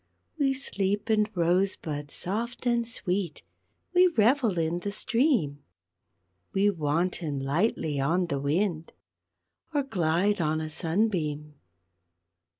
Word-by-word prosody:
_ - - +2
_We 270 -1 +2
sleep 205 -4 -1
in 215 -1 +3
rose 180 +3 +2
buds 145 -2 -6
soft 230 +7 -3
and 235 -1 +1
sweet, 185 -7 -1 0.5
We 365 +1 +6
revel 235 - +2
in 165 +1 0
the 200 +3 -4
stream, 210 - +1 0.9
We 200 +1 +3
wanton 160 -1 -1
lightly 150 +1 0
on 170 +7 +1
the 140 -5 -2
wind, 160 +3 -1 0.8
Or 285 - +2
glide 190 -3 +1
on 155 0 +1
a 155 0 -4
sunbeam. 160 -4 -1
180 Hz, 120 wpm, -27 LUFS, 155-215 Hz, 0.9 s, We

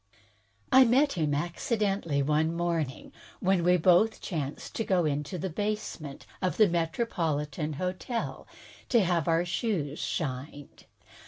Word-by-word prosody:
I 260 - +8
met 265 +4 +3
him, 155 -5 0
accidentally 175 - -1
one 155 +3 +1
morning, 170 -5 -2 0.3
when 190 -2 +2
we 180 +1 +4
both 180 +6 +4
chanced 150 -6 -5
to 225 - 0
go 185 -5 +2
into 150 +3 -2
a 180 +2 -3
basement 190 -6 -4 0.2
of 185 - -1
the 215 - +6
MetropoUs 160 - -1
Hotel 185 - -4 0.4
to 235 -4 +5
have 175 -4 0
our 165 +1 +2
shoes 175 -7 -2
shined. 140 0 -5
170 Hz, 130 wpm, -29 LUFS, 150-195 Hz, 0.4 s, I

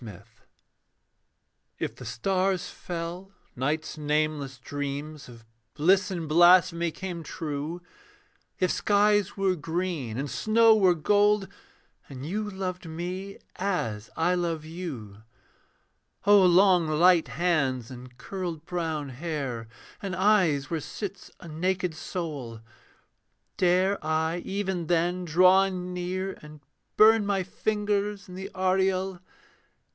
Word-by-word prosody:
JOSEPH 105 -6 -10 1.5
If - - -4
the - - -10
stars 185 +7 0
fell; 175 +3 -6 0.2
night's 155 +5 -2
nameless 150 -2 -1
dreams 145 +2 -5
Of 115 -1 -14 0.3
bliss 185 +5 +3
and 170 -4 -4
blasphemy 175 +1 +5
came 175 +1 -6
true, 155 +2 -5 0.8
If 185 - +2
skies 205 -1 +2
were 195 -1 +2
green 160 -7 -3
and 140 +2 -2
snow 220 - +4
were 190 -4 +4
gold, 205 +4 +3 0.6
And 135 -1 -8
you 210 +6 -3
loved 185 -3 -5
me 180 +4 -5 0.2
as 120 - -2
I 170 +3 +2
love 170 -3 -2
you; 140 - -7 1.0
O 205 -1 +7
long 180 -1 +5
light 170 +2 +4
hands 135 -9 0
and 125 0 -11
curled 175 -2 -5
brown 160 -5 -3
hair, 135 -5 -4 0.3
And 195 -2 -4
eyes 180 -8 +2
where 165 - 0
sits 195 +4 -7
a 170 - -11
naked 180 +2 -1
soul; 150 - -6 0.9
Dare 185 +1 +2
I 160 +2 0
even 190 -3 -3
then 175 +2 +1
draw 185 +4 +5
near 180 +1 -4
and 150 0 -12 0.4
burn 220 0 +7
My 200 -2 0
fingers 205 +1 -2
in 180 - -11
the 190 +2 -6
aureole? 190 0 +1
175 Hz, 115 wpm, -27 LUFS, 155-190 Hz, 1.5 s, O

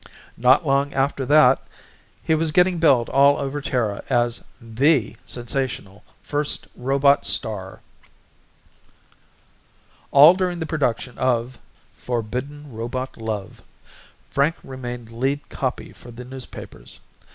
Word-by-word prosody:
Not 130 +7 +4
long 140 0 +1
after 135 -1 0
that 145 -3 +5 0.6
he 160 - +1
was 160 0 +1
getting 180 +1 +3
billed 135 -8 +4
all 140 +1 +5
over 140 +1 -3
Terra 115 -7 -2
as 120 0 +1 0.2
the 125 +3 +1
sensational 120 -5 -3 0.2
first 145 0 -1
robot 140 +2 +2
star. 95 -4 -3 2.3
All 145 +5 +8
during 180 -1 -1
the 160 - -2
production 130 -6 -2
of 125 0 0 0.3
Forbidden 125 +5 -5
Robot 120 +4 -5
Love 110 -4 -5 0.7
Frank 145 +4 +2
remained 125 -3 -7
lead 135 +5 -2
copy 130 -2 -4
for 120 - -15
the 120 +1 -10
newspapers. 125 - -10
130 Hz, 110 wpm, -22 LUFS, 120-145 Hz, 2.3 s, All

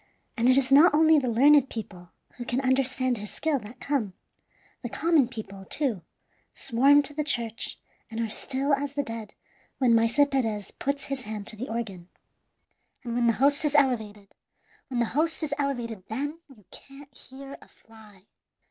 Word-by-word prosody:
And 240 0 +2
it 255 - +6
is 270 -1 +1
not 295 +3 +7
only 315 0 +5
the 260 - -3
learned 275 +3 +5
people 180 -6 -7 0.3
who 245 - -5
can 245 +1 -2
understand 255 -2 +1
his 210 0 -6
skill 310 -3 -1
that 235 +3 -12
come; 250 -10 -2 0.7
the 240 - -5
common 315 -1 +2
people, 210 -5 -8
too, 235 - -1 0.5
swarm 275 +3 +4
to 290 - -4
the 300 +1 -2
church, 235 -6 -2 0.3
and 225 0 -6
are 230 - 0
still 270 +6 -1
as 280 0 -1
the 285 0 -1
dead 225 -3 -7 0.4
when 250 -3 +3
Maese 230 +3 +2
Perez 220 -7 -1
puts 280 +1 -3
his 275 -1 -4
hand 210 -2 -6
to 220 - -6
the 240 +5 -6
organ. 200 -6 -5 0.9
And 235 -2 -5
when 240 0 +1
the 230 - +4
host 285 +5 +2
is 300 -1 0
elevated 220 -8 0 0.5
when 250 -3 -3
the - - +2
host 320 +3 0
is 295 -2 -2
elevated, 240 -8 -3
then 290 +8 -4
you 215 -8 -19
can't 275 0 -13
hear 270 +1 -10
a - - -16
fly. 215 -4 -19
255 Hz, 175 wpm, -26 LUFS, 225-280 Hz, 0.9 s, not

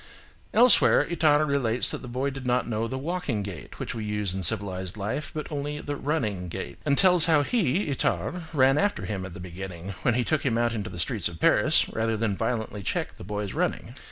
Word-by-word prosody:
Elsewhere, 240 +1 +6
Itard 155 -3 +3
relates 125 -4 +2
that - - -5
the 130 - -9
boy 130 +3 -2
did 135 -1 -7
not 125 -1 +1
know 115 -1 -1
the 130 - -4
walking 140 - -2
gait 95 -5 -8
which - - -4
we 110 - -5
use 105 -3 -1
in 95 - -3
civilised 95 0 -1
life, 105 +9 -3
but 155 0 -6
only 145 0 -3
the 145 0 -4
running 115 - -2
gait, - - -6
and 140 -1 +3
tells 180 -4 +6
how 155 -3 +4
he, 190 - +1
Itard, 165 +4 -1
ran 135 -2 +4
after 205 0 0
him 95 -3 -4
at 90 - -11
the - - -8
beginning, 90 0 -7
when 120 - +2
he 125 - +2
took 155 +4 0
him 120 -4 +1
out 120 0 +1
into 110 -1 -4
the - - -9
streets 95 +3 0
of 85 -1 -9
Paris, - - +4
rather 110 0 -1
than 105 -2 0
violently 110 -1 -2
check - - -3
the - - -10
boy's 105 0 -4
running. - - -2
120 Hz, 215 wpm, -26 LUFS, 100-145 Hz, -, Elsewhere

